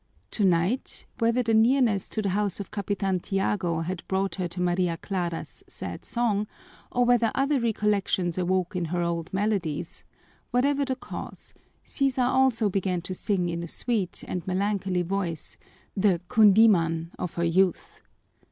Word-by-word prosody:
Tonight, 190 +4 +1
whether 235 +2 +2
the 225 -1 +1
nearness 225 -3 +3
to 215 - -3
the 200 - 0
house 205 -2 0
of 200 - -6
Capitan 195 -2 -1
Tiago 190 -3 -1
had 175 +1 -3
brought 190 0 0
to 180 +1 -3
her 180 - -7
Maria 175 -1 +1
Clara's 175 -3 -4
sad - - -7
song 215 -3 0 0.4
or 245 0 +2
whether 240 -2 +3
other 275 +1 +2
recollections 205 -6 0
awoke 185 +1 0
in 180 -1 0
her 175 +2 -1
old 170 0 -2
melodies, 195 -6 -2 0.5
whatever 280 +3 +2
the 260 -1 -1
cause, 260 - -8 0.3
Sisa 270 -2 0
also 250 -3 +3
began 185 -3 -1
to 185 - -4
sing 185 -1 0
in 170 0 -3
a 170 - -5
sweet 205 0 -2
and 180 -1 -4
melancholy 190 -1 0
voice 175 -3 -3 0.4
the 190 -3 +3
kundíman 190 -6 +5
of 180 - -4
her 170 - 0
youth. 180 +1 +1
195 Hz, 150 wpm, -26 LUFS, 175-220 Hz, 0.5 s, kundíman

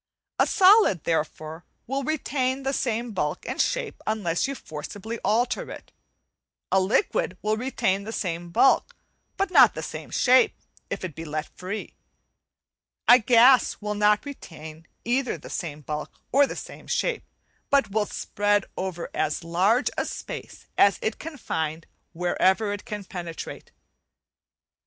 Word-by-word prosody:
A - - +5
solid, 380 - +5
therefore, 160 0 -2 0.2
will 270 +3 -2
retain 270 -3 -1
the 270 +1 -1
same 235 -2 -1
bulk 150 -7 -2
and - - 0
shape - - -2
unless 200 -5 0
you 275 - -4
forcibly 205 - -7
alter 240 +4 +1
it; - - -10 0.8
a 190 - +5
liquid 255 - +1
will 215 +1 +1
retain 215 -5 -1
the 220 - -6
same 175 -5 -3
bulk, 220 +10 +3 0.4
but 390 -1 0
no - - +9
the - - -7
same - - -7
shape 255 0 +4 0.3
if - - -3
it 175 - -6
be 165 - -7
left 155 0 -5
free; 190 +4 -6 1.1
a 245 - +9
gas 245 +3 +5
will 210 0 -3
not 210 +2 +3
retain 160 - -10 0.2
either 250 +2 0
the - - -11
same 155 -4 -4
bulk 150 +2 -5 0.2
or 280 +1 +5
the - - -6
same - - -9
shape, 470 -3 0 0.5
but 280 -7 +3
will 210 0 +1
spread 205 -1 0
over 185 -2 -4
as 155 +2 -1
large 190 +10 +2
a - - 0
space - - -7
as 200 - +6
it 220 - -2
can 315 -1 -7
find 160 - -3 0.3
wherever 190 +4 +1
it 205 - -7
can 210 -1 -5
penetrate. 170 -3 -7
210 Hz, 145 wpm, -25 LUFS, 170-255 Hz, 1.1 s, no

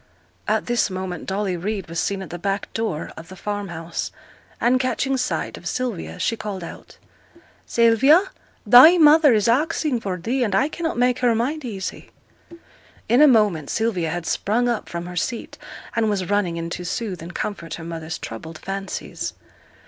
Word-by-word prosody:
At - - +1
this 240 -3 +1
moment 185 -2 -5
Dolly 195 -1 -1
Reid 195 +2 -3
was 165 0 -3
seen 195 0 -1
at - - -10
the 175 - -6
back 195 +2 -2
door 220 -9 -3
of 165 +1 -11
the 190 - -9
farmhouse, 175 -5 -4 0.5
and 250 +2 +3
catching 265 +1 0
sight 255 -1 -2
of - - -8
Sylvia, 245 -10 -3
she 230 - 0
called 210 -4 -5
out - - -10 0.7
'Sylvia, 235 - +5 0.4
thy 255 - +9
mother 305 -2 +7
is 210 0 +2
axing 290 +1 +1
for 190 -4 -3
thee, 240 +9 -1
and 205 -5 0
I 270 +8 +3
cannot 325 -3 -3
make 250 0 +2
her 245 -2 +3
mind 280 +7 -1
easy.' 200 -6 -6 1.0
In 245 +4 +4
a 300 - +9
moment 210 - +3
Sylvia 200 -8 0
had 175 +1 -4
sprung 230 +8 0
up 235 -3 -2
from 170 0 -5
her 180 0 -7
seat, 230 +7 -3 0.4
and 225 -1 +2
was 200 -2 -2
running 190 -5 +1
in 165 0 -4
to 180 - -4
soothe 185 -1 -3
and 170 +1 -9
comfort 170 -6 -4
her 165 - -9
mother's 160 -1 -5
troubled 155 +8 -8
fancies. 195 +2 -5
205 Hz, 175 wpm, -22 LUFS, 175-245 Hz, 1.0 s, thy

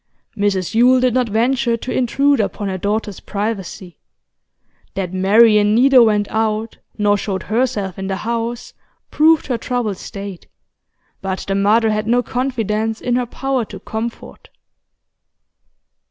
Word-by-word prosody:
Mrs 200 -4 -1
Yule 250 +3 +5
did 250 -1 +2
not 250 -2 +1
venture 235 +2 +1
to 245 - -5
intrude 275 +2 +2
upon 205 -1 -2
her 190 - -3
daughter's 205 0 -2
privacy. 200 -4 -5 1.0
That 185 -2 -3
Marian 210 +2 +4
neither 260 +1 +6
went 210 -3 +3
out 220 0 -1 0.2
nor 205 -1 +2
showed 190 -3 -3
herself 215 -5 -1
in 190 - -4
the 195 - -2
house 230 +3 -4 0.4
proved 315 0 +4
her 245 -3 -2
troubled 230 -5 -2
state, 195 -2 -8 0.7
but 190 -1 -4
the 195 - 0
mother 215 +3 +3
had 215 0 -2
no 245 +2 +2
confidence 225 -4 -2
in 245 -1 -1
her 250 -1 0
power 265 0 -2
to 195 - -10
comfort. 225 +4 -7
220 Hz, 140 wpm, -18 LUFS, 200-245 Hz, 1.0 s, neither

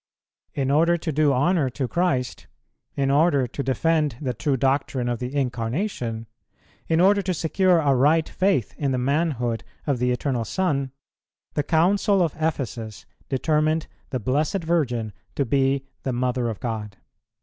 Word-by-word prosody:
In 135 -1 0
order 165 +4 +4
to 160 -1 -3
do 150 0 +3
honour 145 +2 +2
to 130 +1 -3
Christ, 130 - -1 0.5
in 135 -1 +1
order 145 -2 +3
to 125 - -5
defend 150 0 +1
the 130 -4 -2
true 135 +4 0
doctrine 135 -1 0
of 120 -2 -1
the 125 +3 -5
Incarnation, 120 - -2 0.6
in 160 0 +2
order 200 +3 +5
to 185 -1 -2
secure 180 +3 +2
a 145 -4 +3
right 150 +5 +3
faith 185 - 0
in 140 -3 0
the - - 0
manhood 125 -4 0 0.2
of 140 -5 0
the 125 +1 +1
Eternal 125 -1 -1
Son, 140 - -1 0.6
the 150 - +1
Council 185 +5 +3
of 165 - -1
Ephesus 120 -9 -3 0.2
determined 155 +3 +1 0.2
the 130 - -2
Blessed 150 - 0
Virgin 125 -10 0 0.2
to 140 - +1
be 135 +2 +1 0.2
the 130 - -2
Mother 125 0 0
of 110 - -5
God. 105 -3 -4
140 Hz, 155 wpm, -24 LUFS, 125-160 Hz, 0.6 s, order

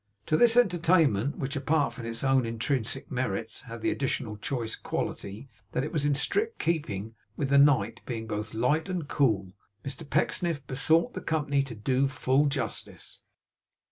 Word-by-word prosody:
To 155 - +2
this 235 +6 +5
entertainment, 165 - +3
which 135 +2 -3
apart 145 +1 +1
from 115 -2 -7
its 115 +2 -4
own 135 -1 +3
intrinsic 120 +3 -2
merits, 115 -4 -3
had 115 -1 -7
the - - +1
additional 125 -5 -2
choice 115 +1 -3
quality, 100 +7 -4 0.3
that 125 - 0
it 150 - -5
was 150 -3 +1
in 145 -1 +2
strict 440 - 0
keeping 115 - -2 0.2
with 140 - -1
the 140 0 +6
night, 120 -6 +4
being 115 -3 -4
both 110 0 -4
light 145 - +1
and 175 -5 -3
cool, 105 -12 +1 0.3
Mr 135 +1 -6
Pecksniff 165 -6 0
besought 155 +6 +2
the - - -5
company 145 -3 +1
to 135 -4 -6
do 130 +5 +1
full 135 +2 +2
justice. 135 -6 -4
135 Hz, 165 wpm, -28 LUFS, 115-150 Hz, 0.3 s, the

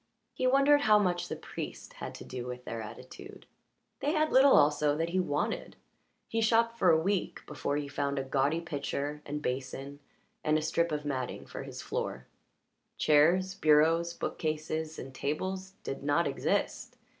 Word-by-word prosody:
He 255 - 0
wondered 275 +2 +5
how 215 -5 +6
much 180 -4 +1
the - - -4
priest - - -7
had - - -7
to - - -9
do 125 -1 -6
with 125 0 -7
their 115 -1 -4
attitude. 130 - -10 0.5
They 295 - 0
had 310 -1 +2
little 265 +1 +7
also 145 0 +3
that 165 +1 -1
he 185 +2 0
wanted 150 -4 -2 0.5
he 225 -1 -1
shopped 230 +1 +2
for 180 - +5
a 160 -1 +5
week 195 +3 -1
before 145 -1 -2
he 145 -1 -3
found 140 0 -2
a 135 - 0
gaudy 140 +4 +1
pitcher 145 -1 -3
and 150 +1 -4
basin 135 +2 -4 0.4
and 155 0 +3
a - - -1
strip 170 +1 +1
of 150 -1 -3
matting 130 -3 -3
for - - -7
his - - -8
floor. 65 0 -3 0.7
Chairs, 170 +6 +4
bureaus, 165 +1 +3
bookcases, 155 0 -3
and 130 +1 -8
tables 185 +7 -3
did 135 - -5
not 145 +4 +2
exist. 135 - -1
155 Hz, 165 wpm, -30 LUFS, 140-185 Hz, 0.7 s, little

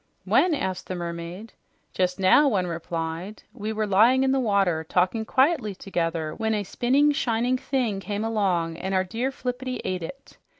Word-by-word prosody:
"When?" 350 -3 +3
asked 190 -9 -3
the 185 - -4
mermaid. 170 +4 -6 0.4
"Just 180 +1 0
now," 195 +10 +5
one 195 -6 +1
replied. 170 +3 -5
"We 210 +2 -4
were 215 0 -1
lying 225 +7 +4
in 265 - +2
the 270 - +2
water, 195 -8 +1
talking 185 +7 0
quietly 260 - +2
together 165 -4 -2
when 220 -1 -1
a 205 - -1
spinning, 265 +9 +2
shining 250 -2 0
thing 245 -8 -1
came 205 +1 -3
along 180 -7 0
and 190 +2 -3
our 185 - +3
dear 230 +8 -2
Flippity 255 -1 -4
ate 185 -1 -2
it. 270 +12 -10
205 Hz, 170 wpm, -25 LUFS, 180-245 Hz, 0.4 s, now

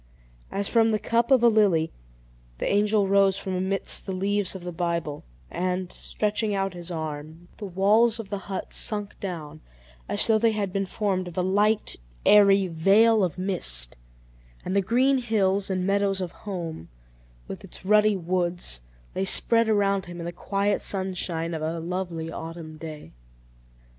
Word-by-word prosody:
As 200 0 -2
from 225 -1 +3
the 215 - +2
cup 235 +3 0
of 260 -3 +5
a - - +8
lily, 200 -8 +3 0.7
the - - -2
angel 205 0 +2
rose 195 0 +4
from 190 - -4
amidst 190 +3 -1
the - - -2
leaves 200 +1 0
of 185 - -8
the 175 - -5
Bible; 170 -3 -3 0.3
and, 180 0 -2
stretching 210 0 -2
out 195 -1 -1
his 175 0 -9
arm, 160 0 -6
the 205 - -6
walls 210 +5 +3
of 210 -3 -8
the 200 - -2
hut 190 - -5
sunk 205 -1 -2
down, 155 -5 -6 0.5
as - - +2
though 220 -1 +3
they 225 0 +3
had 200 -3 -2
been 195 -1 -1
formed 190 -3 -1
of 175 - -10
a 180 - +1
light, 205 +3 +1 0.3
airy 200 -2 +6
veil 195 +6 +4
of 180 -1 -1
mist, 165 - -2 0.7
and 185 - -2
the 200 - +4
green 255 +7 +2
hills 200 -5 +1
and 185 -1 -1
meadows 200 0 +1
of 180 -2 -4
home, 170 - -6 0.6
with - - -8
its - - -10
ruddy 210 0 +4
woods, 175 - -1 0.3
lay 190 - -1
spread 230 +4 +3
around 200 -2 +1
him 175 0 -8
in 170 - -5
the 170 - -3
quiet 200 +3 -1
sunshine 180 -3 -1
of 160 - -4
a 160 +2 -2
lovely 170 -1 -4
autumn 165 -1 -7
day. 155 -1 -9
190 Hz, 170 wpm, -25 LUFS, 175-205 Hz, 0.7 s, a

